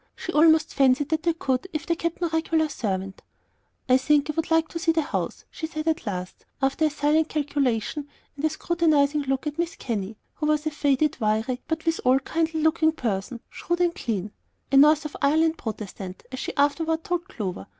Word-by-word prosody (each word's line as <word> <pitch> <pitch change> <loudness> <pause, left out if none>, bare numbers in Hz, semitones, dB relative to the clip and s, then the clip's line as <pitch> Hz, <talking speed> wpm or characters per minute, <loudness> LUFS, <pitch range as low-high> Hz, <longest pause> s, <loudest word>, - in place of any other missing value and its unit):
She - - -6
almost 315 0 +5
fancied 270 +1 +3
that 315 0 0
they 335 0 +1
could 270 +1 -1
if 310 +1 -3
they 340 - +1
kept 335 +1 -3
no 345 - +1
regular 320 -1 +1
servant. 195 -7 -3 0.7
"I 255 0 +6
think 290 +3 +2
I - - -11
would 325 +2 -2
like 325 -1 +3
to 335 - -5
see 330 0 +2
the 325 -1 +1
house," - - -4
she 320 - -5
said 310 0 -5
at 320 -5 0
last, 185 -2 -5 0.2
after 275 +3 +1
a - - +3
silent 300 +2 +1
calculation 285 -2 -1 0.3
and 285 - -8
a 315 - +3
scrutinizing 310 -3 +2
look 270 +1 -1
at 300 0 -3
Mrs. 340 0 -2
Kenny, 215 -3 -4 0.2
who 305 - -2
was 305 0 +1
a 310 - 0
faded, 290 -1 +1
wiry, 220 +3 0
but 320 0 -3
withal 265 -6 +3
kindly 320 +2 -1
looking 315 0 +3
person, 230 -2 -3
shrewd 345 0 -2
and 350 -1 +2
clean, 210 - -3 0.4
a 275 - +5
North 300 +2 +6
of 300 - -6
Ireland 315 +3 +3
Protestant, 200 -4 -6
as 260 - -5
she - - -4
afterward 320 +3 +1
told 355 +1 -2
Clover. 185 - -5
300 Hz, 200 wpm, -25 LUFS, 255-320 Hz, 0.7 s, I